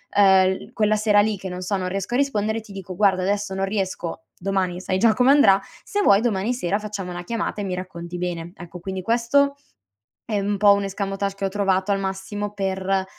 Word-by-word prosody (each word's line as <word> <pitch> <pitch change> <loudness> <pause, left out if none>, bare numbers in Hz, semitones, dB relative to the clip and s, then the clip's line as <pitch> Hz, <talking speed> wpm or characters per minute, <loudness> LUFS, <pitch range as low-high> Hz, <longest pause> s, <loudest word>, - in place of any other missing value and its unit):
ehm, 190 -2 +6 0.2
l - - -20
quella 215 -2 +2
sera 210 -1 +3
lì 210 0 +2
che 190 0 -7
non 180 0 -6
so 190 +3 -1
non 185 -1 -2
riesco 195 +4 -4
a 245 - +3
rispondere 220 -5 0
ti 210 - -15
dico: 190 -2 -7
"Guarda 190 -2 +3
adesso 205 0 -1
non 195 - 0
riesco 190 -5 -3
domani, 185 -1 -1
sai 185 0 -1
già 225 0 +5
come 250 +3 +4
andrà, 200 -9 +6 0.2
se 410 - -1
vuoi 200 - +5
domani 225 0 0
sera 205 -4 -1
facciamo 205 -4 -5
una 175 0 -6
chiamata 225 0 -3
e 205 - -2
mi 185 - -3
racconti 175 -1 -7
bene." 175 -1 -4
Ecco 175 -1 -10
quindi 190 +1 -5
questo 245 +7 +2 0.7
è 215 -2 -1
un 200 +1 -1
po' 205 0 +6
un 200 0 +1
escamotage 195 0 -3
che 200 - -5
ho - - +2
trovato 195 0 +1
al 195 - +1
massimo 195 +2 -4
per, 190 -1 -1
195 Hz, 220 wpm, -23 LUFS, 185-210 Hz, 0.7 s, ehm